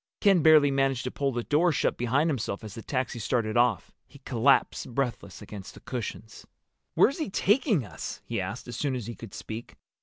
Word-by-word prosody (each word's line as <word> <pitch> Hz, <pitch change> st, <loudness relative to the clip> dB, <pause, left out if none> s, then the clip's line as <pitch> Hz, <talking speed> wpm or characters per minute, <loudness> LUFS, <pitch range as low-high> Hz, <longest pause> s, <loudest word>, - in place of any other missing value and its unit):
Ken 195 Hz, -4 st, +4 dB
barely 150 Hz, -2 st, +6 dB
managed 135 Hz, -2 st, +1 dB
to 125 Hz, -, -3 dB
pull 140 Hz, -1 st, -1 dB
the 120 Hz, -1 st, -3 dB
door 165 Hz, +7 st, +3 dB
shut -, -, +1 dB
behind 130 Hz, +6 st, +1 dB
himself 115 Hz, -9 st, -2 dB
as 105 Hz, -2 st, -8 dB
the 115 Hz, -, -7 dB
taxi 130 Hz, -1 st, -2 dB
started 110 Hz, -1 st, -1 dB
off. 120 Hz, -5 st, +2 dB, 0.2 s
He -, -, -16 dB
collapsed 125 Hz, -1 st, +2 dB
breathless 120 Hz, -7 st, -3 dB
against 100 Hz, -2 st, -9 dB
the -, -, -11 dB
cushions. 115 Hz, -3 st, -6 dB, 0.5 s
"Where's 275 Hz, +7 st, +4 dB
he 310 Hz, -, -2 dB
taking 205 Hz, -, +2 dB
us?" -, -, -7 dB
he -, -, -2 dB
asked, -, -, -6 dB
as 120 Hz, -, -6 dB
soon 135 Hz, +1 st, -1 dB
as 120 Hz, -4 st, -4 dB
he 120 Hz, -, -5 dB
could 115 Hz, -3 st, -10 dB
speak. 110 Hz, +1 st, -7 dB
125 Hz, 195 wpm, -27 LUFS, 115-145 Hz, 0.5 s, barely